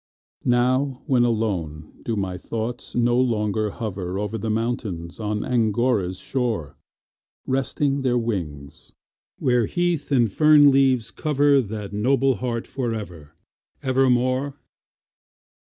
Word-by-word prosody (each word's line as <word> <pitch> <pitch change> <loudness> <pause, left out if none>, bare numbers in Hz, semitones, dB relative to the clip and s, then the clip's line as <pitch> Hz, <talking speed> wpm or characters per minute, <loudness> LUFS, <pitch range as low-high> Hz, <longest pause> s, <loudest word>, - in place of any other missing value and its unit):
Now, 130 +2 +1
when 125 -3 +3
alone, 90 -10 -2
do 115 - -2
my 95 -3 -2
thoughts 115 +5 -5
no 120 0 +3
longer 110 -3 0
hover 95 -4 -4
Over 105 +1 -3
the 110 - -3
mountains 110 -7 -3
on 105 -1 -2
Angora's 110 -5 +1
shore, 105 - -2 0.7
Resting 135 +1 0
their 125 -2 +1
wings, 85 -12 -5 0.4
where 125 -4 +2
heath 175 -4 -1
and 120 -6 +3
fern 150 -2 +6
leaves 135 -4 +2
cover 145 -2 +2
That 105 -3 -6
noble 130 +4 +2
heart 120 -2 -3
for 120 -4 -3
ever, 85 -9 -9 0.5
ever 130 0 +2
more? 130 +3 +1
120 Hz, 120 wpm, -23 LUFS, 105-130 Hz, 0.7 s, fern